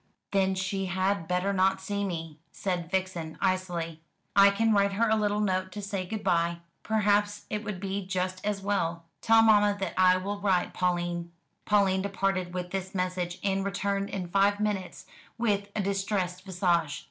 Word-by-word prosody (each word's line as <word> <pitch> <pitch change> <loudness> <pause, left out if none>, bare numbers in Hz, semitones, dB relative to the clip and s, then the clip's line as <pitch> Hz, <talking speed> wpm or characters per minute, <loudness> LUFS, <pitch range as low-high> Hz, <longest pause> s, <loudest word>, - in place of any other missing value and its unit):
"Then 190 -1 +2
she 190 +1 -2
had 190 -1 0
better 180 +2 0
not 190 0 +2
see 200 +1 -3
me," 165 -5 -5
said 180 -4 -3
Vixen 180 -4 -2
icily; 175 -3 -1 0.3
"I 200 0 +8
can 225 +2 +2
write 200 -1 +3
her 230 +4 +2
a 220 - +3
little 210 -1 +1
note 185 -2 0
to 205 - -5
say 195 -2 -3
good 220 +2 -4
bye. 170 0 +1 0.2
Perhaps 205 -1 +1
it 210 0 -2
would 210 -4 -5
be 195 0 -3
just 185 -1 -2
as 205 -1 -2
well. 170 -4 -1 0.2
Tell 225 0 +5
mamma 205 -2 +5
that 190 -3 -2
I 185 0 +6
will 200 +2 -4
write, 190 -3 +1
Pauline." 175 -1 -1 0.3
Pauline 195 -2 +3
departed 195 -2 -1
with 180 -1 -4
this 190 0 -4
message, 180 -1 -2
and 195 -1 +1
returned 200 0 -1
in 185 -3 -4
five 200 +3 +2
minutes 205 -3 -2 0.3
with 205 -3 0
a 210 - +1
distressed 195 -2 -2
visage. 175 -5 0
190 Hz, 170 wpm, -28 LUFS, 180-200 Hz, 0.3 s, I